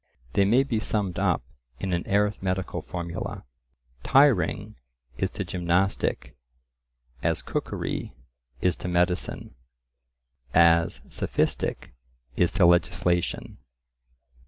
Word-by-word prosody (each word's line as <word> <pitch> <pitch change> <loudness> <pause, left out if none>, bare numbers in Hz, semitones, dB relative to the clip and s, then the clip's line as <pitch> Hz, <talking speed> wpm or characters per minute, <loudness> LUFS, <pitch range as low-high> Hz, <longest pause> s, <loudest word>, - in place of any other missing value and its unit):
They 100 - +4
may 120 +7 +4
be 120 -5 -1
summed 105 -4 -1
up - - +1 0.4
in 95 -2 -2
an 85 - -2
arithmetical 95 -2 0
formula:— 85 -1 -5 0.6
Tiring: 130 - +3 0.4
gymnastic:: 90 -2 -1 1.1
cookery: - - -3 0.7
medicine:: 90 0 -1 1.6
sophistic: - - -1 0.4
legislation. 85 -1 +2
95 Hz, 60 wpm, -26 LUFS, 85-100 Hz, 1.6 s, They